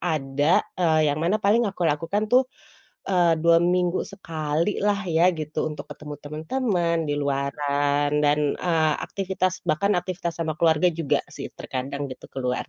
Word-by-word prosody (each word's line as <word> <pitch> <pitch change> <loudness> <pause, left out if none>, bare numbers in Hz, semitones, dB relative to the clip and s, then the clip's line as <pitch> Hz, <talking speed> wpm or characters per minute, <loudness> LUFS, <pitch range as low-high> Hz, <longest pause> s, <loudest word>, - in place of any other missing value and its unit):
ada, 145 -1 +1 0.2
eee, 155 -3 +3
yang 155 - -4
mana 175 +6 +2
paling 215 +2 +2
aku 180 -3 -3
lakukan 165 +7 0
tuh, 255 0 +5 0.6
eee, 175 -3 +4
2 170 0 +5
minggu 180 0 +1
sekalilah 180 +4 -1
ya 170 +3 +4
gitu, 155 -2 -3
untuk 150 -1 -6
ketemu 150 -1 -9
teman-teman, 170 - -1
di 145 - 0
luaran 145 +1 0
dan, 150 0 +1
eee, 160 -3 +2
aktivitas, 185 -1 -2
bahkan 200 +6 +1
aktivitas, 175 -2 -3
sama 160 -2 -2
keluarga 165 +1 +4
juga 160 -3 0
sih - - -6
terkadang 135 +1 -4
gitu, - - -13
keluar. 125 -2 -3
160 Hz, 145 wpm, -24 LUFS, 145-180 Hz, 0.6 s, tuh